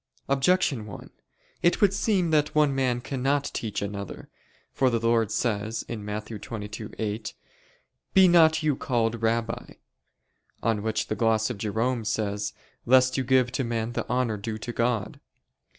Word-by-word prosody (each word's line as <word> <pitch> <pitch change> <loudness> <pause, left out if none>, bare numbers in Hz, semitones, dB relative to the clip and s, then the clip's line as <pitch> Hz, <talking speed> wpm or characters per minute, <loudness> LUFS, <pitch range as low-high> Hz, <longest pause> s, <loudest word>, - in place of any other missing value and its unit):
Objection 135 -4 +2
1: 100 - -10 0.5
It 175 0 +3
would 200 -2 +4
seem 195 -5 +1
that 150 -1 +2
one 150 -2 +4
man 130 -2 0
cannot 135 +2 -1
teach 110 -3 -3
another. 100 -1 -6 0.4
For 130 - +3
the 115 - +1
Lord 115 -2 +2
says 110 -1 -1
(Matt. 105 -1 -5
22:8): 105 0 -5 0.8
"Be 190 -1 +8
not 160 -2 +5
you 150 -3 +2
called 115 -3 -1
Rabbi": 115 0 -1 0.9
on 110 -2 +1
which 110 0 -1
the 110 - -3
gloss 110 0 +2
of 110 - -7
Jerome 115 +3 -1
says, 105 -1 -2 0.4
"Lest 130 +1 +5
you 130 - 0
give 130 -1 +3
to 135 - -1
men 115 -1 -2
the - - -3
honor 125 -3 0
due 110 +2 -4
to 120 +2 -6
God." 115 -3 -1
115 Hz, 150 wpm, -26 LUFS, 110-135 Hz, 0.9 s, Be